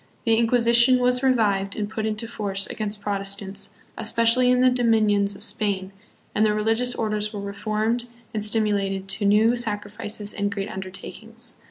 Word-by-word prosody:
The 225 - +3
Inquisition 235 +2 +4
was 250 0 +2
revived 205 -7 +2
and 210 -1 -2
put 220 +1 -3
into 215 +1 -2
force 200 -4 -2
against 210 -1 -4
Protestants, 200 -1 -3 0.3
especially 230 +3 +3
hi 250 - +3
the 255 0 +5
dominions 215 -5 +2
of - - -10
Spain, 200 -3 -2 0.4
and 215 - +2
the 210 -1 +3
religious 225 +3 +1
orders 210 -1 -1
were 210 - -6
reformed 215 +4 -2 0.3
and 215 -1 -1
stimulated 205 -3 +2
to 195 +2 -2
new 215 +4 +4
sacrifices 210 -2 -4
and 205 0 -1
great 200 0 -3
undertakings. 220 +5 -7
215 Hz, 155 wpm, -24 LUFS, 200-230 Hz, 0.4 s, the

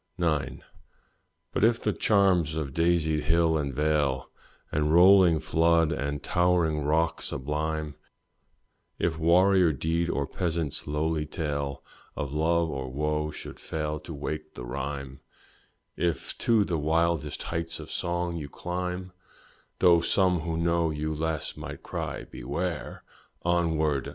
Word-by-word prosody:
IX. 75 -7 -1 0.9
But - - 0
if 115 +1 +4
the - - 0
charms 95 -7 +3
of 75 -4 -3
daisied 80 -2 +1
hill 80 +1 +3
and 70 -3 -1
vale, 75 -2 0 0.4
And 75 0 +1
rolling 90 -1 +7
flood, 80 +1 +3
and 70 -1 -3
towering 85 -3 +2
rock 80 +3 +1
sublime, 75 +2 -2 1.0
If 80 -2 -1
warrior 90 +1 +5
deed 80 +4 -1
or 70 - 0
peasant's 80 -1 -2
lowly 75 +1 -1
tale 70 -3 -3 0.3
Of 70 -1 -4
love 80 +1 +1
or 65 -2 -4
wo 75 +2 -1
should - - -9
fail 75 -1 -3
to 85 - -10
wake 75 +1 -5
the - - -7
rhyme, 70 +1 -5 0.8
If 85 -2 -2
to 115 -3 +3
the 85 -5 -1
wildest 80 +1 0
heights 85 0 -2
of - - -9
song 85 0 -2
you 75 -3 -6
climb, 90 +3 -4 0.7
(Tho' 85 -2 +5
some 90 0 +2
who 80 0 -3
know 85 0 +1
you 75 0 -2
less, 80 0 -2
might - - -8
cry, - - -4
beware!) 80 +6 -4 0.4
Onward! 80 -5 +1
80 Hz, 130 wpm, -27 LUFS, 75-85 Hz, 1.0 s, rolling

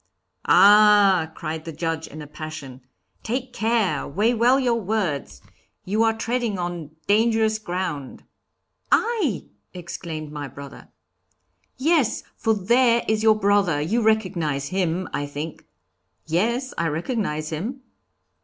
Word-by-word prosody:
'Ah!' 205 -5 +6
cried 160 -1 -5
the 165 - -6
Judge, 160 0 -3
in 155 0 -9
a - - -9
passion. 150 -3 -8 0.4
'Take 250 +2 -3
care, 220 - 0
weigh 210 +11 +1
well 245 +3 +4
your 240 -3 +1
words; 180 - -2 0.4
you 210 +4 0
are 225 0 +2
treading 230 -3 -1
on 175 -4 -4 0.2
dangerous 220 0 +2
ground.' 175 -8 -4 0.7
'I!' 415 - +1 0.3
exclaimed 165 -3 -6
my 145 -1 -5
brother. 140 -1 -11 0.9
'Yes, 290 -3 +1
for 220 -1 +1
there 235 +4 +3
is 215 0 +1
your 220 -1 +5
brother; 200 -7 +2
you 195 +11 0
recognize 175 -11 0
him, 185 0 -1
I 145 - -2
think.' 150 +3 -7 0.6
'Yes, 235 - 0
I 170 - +1
recognize 160 - -2
him.' 220 - -4
190 Hz, 125 wpm, -23 LUFS, 155-225 Hz, 0.9 s, Ah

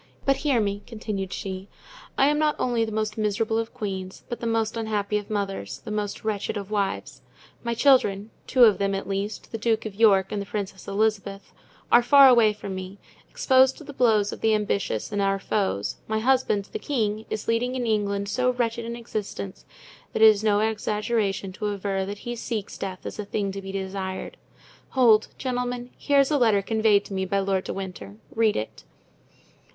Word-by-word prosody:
But 275 -1 +3
hear 280 -6 +1
me," 200 -1 -1
continued 210 -4 -4
she. 190 0 -5 0.5
"I 270 - +5
am 295 +1 +2
not 305 -1 +2
only 240 -2 +1
the 220 - -3
most 215 0 -2
miserable 215 +1 0
of 225 0 -3
queens, 190 -4 -5
but 240 - -4
the 235 - -3
most 225 -1 0
unhappy 210 -2 -1
of 205 - -11
mothers, 195 - -3
the - - -5
most 210 -1 -3
wretched 210 -1 -2
of 200 0 -6
wives. 200 -2 -2 0.4
My 235 -1 -1
children, 225 -5 +3 0.2
two 255 -2 +5
of 215 -5 +6
them, 195 0 0
at 195 - -4
least, 200 +2 -4
the 225 - -4
Duke 225 0 0
of 215 - -5
York 195 -3 +4
and 205 - -2
the - - -5
Princess 195 -2 -5
Elizabeth, 200 -1 -1 0.4
are 240 - +7
far 275 +3 +8
away 235 -4 +6
from 205 -2 -7
me, 185 +1 -7 0.3
exposed 260 0 +4
to - - -11
the 290 -1 -9
blows 220 -6 +2
of - - -9
the 220 -1 +3
ambitious 200 - -1
and 205 -1 0
our 195 0 +2
foes; 195 - -1
my 220 - 0
husband, 230 -4 +2
the - - -4
king, 220 -6 -1
is 215 - -4
leading 245 +3 0
in 250 -2 -2
England 200 -2 0
so 250 +5 +1
wretched 235 -1 -1
an 235 0 -4
existence 210 -4 -6 0.5
that 220 - +2
it 220 - +11
is 210 -1 +2
no 210 -1 +3
exaggeration 210 -2 -1
to 210 +2 -3
aver 195 -1 -2
that 205 +1 -5
he 240 0 -3
seeks 225 -3 -4
death 190 -2 -6
as - - -6
a - - -1
thing 200 -1 -2
to 195 +1 -6
be 195 0 -7
desired. 190 -1 -4 0.6
Hold! 225 -4 +5
gentlemen, 245 -1 -3
here 285 -1 +3
is 275 - +1
the 295 -2 +2
letter 215 -5 +3
conveyed 220 -1 +3
to - - -8
me 190 0 -1
by 195 +1 -1
Lord 195 -1 0
de - - -3
Winter. 180 - -7 0.2
Read 225 -2 +2
it." 110 - -5
210 Hz, 200 wpm, -25 LUFS, 195-230 Hz, 0.6 s, it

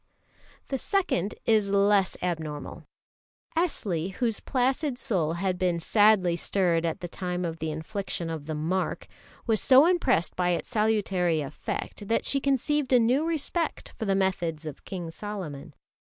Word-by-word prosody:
The 270 - -1
second 230 - 0
is 215 -3 +3
less 200 -1 +3
abnormal. 160 -4 -4 0.7
Esli, 195 - -1
whose 230 0 0
placid 265 +1 0
soul 180 - 0
had 180 +1 -1
been 180 -2 +1
sadly 205 -1 +4
stirred 170 -2 +1
at 160 - -3
the 175 - -4
time 180 0 -3
of 165 -1 -4
the 160 - -2
infliction 170 +3 -4
of 160 -3 -5
the 155 - -3
"mark," 170 +5 -1 0.4
was 220 -3 +2
so 265 +3 +7
impressed 330 - +2
by 180 -1 +1
its - - -8
salutary 200 -7 +1
effect 150 +7 -5
that 230 - +1
she 275 - +2
conceived 275 +1 0
a 250 - +6
new 255 +7 +2
respect 330 +1 -2
for 220 - -4
the 195 -1 +2
methods 175 -5 -1
of 150 -3 -8
King 175 -4 -5
Solomon. 185 -8 -7
195 Hz, 155 wpm, -27 LUFS, 170-240 Hz, 0.7 s, so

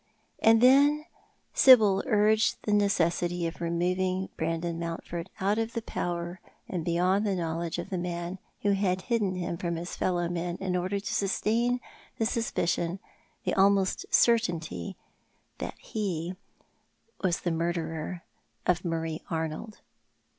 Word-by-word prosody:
And 225 0 +5
then 285 +4 +5 0.5
Sibyl 215 -7 +7
urged 215 -1 +3
the 210 - 0
necessity 175 -3 +1
of 165 +1 -5
removing 185 +2 0
Brandon 165 +1 -2
:^[ountford 170 +1 -4
out 200 +3 +1
of 225 0 -2
the 230 - -2
power 175 -1 -3 0.3
and 175 -3 -3
beyond 180 +4 +2
the 200 -3 0
knowledge 165 -1 -2
of 175 - -5
the 185 - -1
man 175 +1 -4 0.2
who 205 - +3
had 190 -2 +1
hidden 215 -6 0
him 175 -1 -3
from 170 0 -2
his 170 +2 -5
fellow 175 -2 0
men 175 0 -3
in 185 -1 -1
order 185 +3 -1
to 205 - -4
sustain 230 +5 +1 0.4
the 225 - +1
suspicion— 180 -6 0 0.5
tho - - +1
almost 195 -1 +3
certainty— 170 - +1 0.6
that - - -5
he 185 -4 -3 0.9
was 185 0 +1
the 175 - -1
murderer 165 0 -2 0.4
of 180 -1 +2
Marie 165 -2 -2
Arnold. 160 +6 -4
180 Hz, 135 wpm, -28 LUFS, 170-205 Hz, 0.9 s, Sibyl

